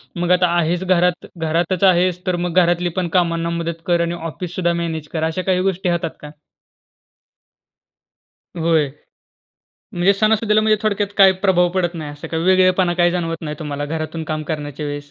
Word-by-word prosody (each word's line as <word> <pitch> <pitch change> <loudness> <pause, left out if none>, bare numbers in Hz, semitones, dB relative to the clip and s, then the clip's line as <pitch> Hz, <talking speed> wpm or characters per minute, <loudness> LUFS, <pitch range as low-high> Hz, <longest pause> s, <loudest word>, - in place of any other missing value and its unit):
मग 175 0 -1
आता 180 0 +4
आहेस 170 +2 0
घरात 180 -1 +1
घरातच 165 +3 -1
आहेस 180 -1 +3
तर 180 - +1
मग 175 - -3
घरातली 175 +1 +1
पण 180 - -1
कामांना 170 -1 0
मदत 170 -1 -4
कर 175 -1 +2
आणि 170 0 -1 0.2
ऑफिससुद्धा 175 +1 -2
मॅनेज 160 -2 -4
कर 160 -2 -2
अश्या 160 +3 -1
काही 185 -1 +1
गोष्टी 190 -1 -1
होतात 170 -1 -1
का? 150 - -9 2.3
होय. 160 -3 +2 1.1
म्हणजे 175 +3 +3
सणासुदीला 215 +1 +2
म्हणजे 215 0 +3
थोडक्यात 205 -1 0
काही 195 -1 +7
प्रभाव 180 -2 +4
पडत 175 -2 0
नाही 155 -3 -6
असं 145 - -9
काही 160 0 -2
वेगळेपणा 185 -1 +3
काही 175 0 +3
जाणवत 165 -2 -2
नाही 150 -1 -5
तुम्हाला 145 -1 -4
घरातून 155 +1 -4
काम 155 0 -3
करण्याच्या 150 -1 -4
वेळेस? 145 0 -6
175 Hz, 165 wpm, -19 LUFS, 160-185 Hz, 2.3 s, काही